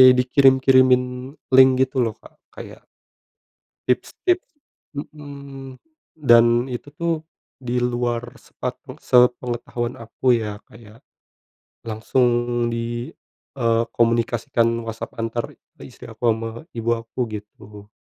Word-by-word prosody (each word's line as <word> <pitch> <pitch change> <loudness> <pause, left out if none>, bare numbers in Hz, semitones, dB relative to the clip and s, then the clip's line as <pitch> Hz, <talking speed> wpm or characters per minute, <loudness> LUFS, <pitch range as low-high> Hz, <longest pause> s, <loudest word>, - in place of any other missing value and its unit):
dikirim-kirimin 130 0 +5 0.5
link 130 0 +8
gitu 130 0 -3
loh, 115 -3 0
Kak, - - -18 0.2
kayak - - -11 1.0
tips-tip 360 0 0 0.6
mhm, 140 -3 -10 0.4
dan 120 -2 +5
itu 130 +3 -7
tuh 170 +3 -1 0.4
di 125 -1 -2
luar 120 -1 -2
sepat - - -6 0.2
e - - -14
sepengetahuan 125 -1 +1
aku 120 +2 0
ya, 105 -2 -4
Kayak 110 0 -16 0.8
langsung 115 +3 +1 0.4
di, 120 +1 -4 0.5
eee, 115 -1 +2
komunikasikan 115 0 +1 0.2
WhatsApp 115 +1 -7
antar 115 +1 -3
ke - - -23
istri - - -12
aku 120 -2 0
sama 115 +3 -5
ibu 115 0 -2
aku 115 +2 -10
gitu. 105 -1 -10
120 Hz, 105 wpm, -22 LUFS, 115-130 Hz, 1.0 s, link